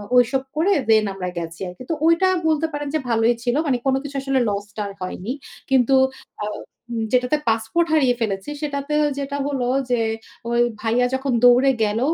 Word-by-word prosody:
ঐসব 255 +2 +3
করে 365 +6 +3 0.2
দেন 215 -1 +5
আমরা 180 -2 -4
গেছি 165 0 -5
আর 180 - -7
কি। - - -9
তো - - +2
ঐটা 335 +3 +4 0.2
বলতে 315 0 +2
পারেন 290 0 -3
যে - - +2
ভালোই 230 +1 +3
ছিল। 245 +1 +1
মানে 255 -3 +2
কোন 265 0 +3
কিছু 285 -1 -8
আসলে 270 -1 +1
লস 200 0 -2
টা 215 - -3
আর 200 - -8
হয়নি। 185 +5 -4 0.4
কিন্তু 265 0 +4 0.5
আ - - -1 0.5
উম 225 -1 -1
যেটাতে 250 +4 +3
পাসপোর্ট 225 +10 +1
হারিয়ে 260 -5 +4
ফেলেছি 195 +2 -2
সেটাতেও 300 +1 -1 0.2
যেটা 280 +1 -3
হলো 260 -4 -1 0.2
যে, 240 -2 +2 0.5
ওই 235 - +2 0.2
ভাইয়া 235 +2 +2
যখন 265 -1 -1
দৌড়ে 250 +2 +6
গেল 210 +2 0
250 Hz, 190 wpm, -22 LUFS, 225-280 Hz, 0.5 s, দৌড়ে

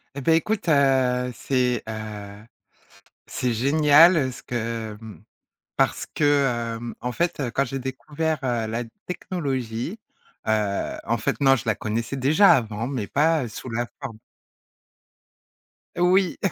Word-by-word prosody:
Et 140 - -4
beh 160 +5 +4
écoute, 200 +3 0
heu, 130 -3 +3
c'est, 125 -2 0
heu, 105 -1 -7 0.8
c'est 125 - -1
génial 145 +4 +5
ce - - -11
que, 115 -2 -4
mmh, 105 -5 -11 0.5
parce - - +1
que, 135 -6 +1
hem, 115 +1 -6
en 125 - -3
fait, 170 +5 -1
quand 140 - +2
j'ai 135 +1 -4
découvert, 150 +4 -3
heu, 120 -3 0
la 115 +2 -3 0.2
technologie, 140 - -3 0.5
heu, 105 -2 0
en 115 - +1
fait 110 - -2
non, 135 -1 +5
je 115 - -5
la 110 - +1
connaissais 115 +6 -3
déjà 155 +10 +5
avant, 115 -2 -1
mais 130 -7 -3
pas, 155 +1 +2
heu, - - -5
sous 125 +3 -8
la 120 +1 -1 0.2
forme 110 -1 -6 1.8
Oui, 180 +1 +3
125 Hz, 140 wpm, -24 LUFS, 115-145 Hz, 1.8 s, génial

